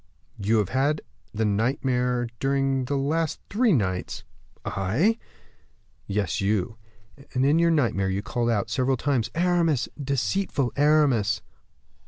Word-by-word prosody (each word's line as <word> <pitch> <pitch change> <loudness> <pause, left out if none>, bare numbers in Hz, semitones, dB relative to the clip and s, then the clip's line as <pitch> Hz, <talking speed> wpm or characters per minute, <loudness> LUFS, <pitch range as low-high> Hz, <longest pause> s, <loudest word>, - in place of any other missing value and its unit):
"You 105 +3 +2
have 105 -3 +1
had 140 +5 +1 0.3
the 110 +1 -1
nightmare 125 +3 0
during 135 -1 +1
the 140 +3 -2
last 155 +3 -1
three 230 +2 +3
nights." 95 - -1 0.4
"I?" 135 - +1 0.9
"Yes, 100 -3 -1
you; 105 +2 0 0.6
and 130 +1 +2
in 150 +4 +4
your 170 0 +4
nightmare 115 -12 +1
you 95 +1 -2
called 120 +2 -1
out, 105 -4 0
several 130 0 +1
times, 125 -4 0
'Aramis, 170 -5 +1
deceitful 140 - -1
Aramis! 140 -8 +3
130 Hz, 125 wpm, -25 LUFS, 110-150 Hz, 0.9 s, in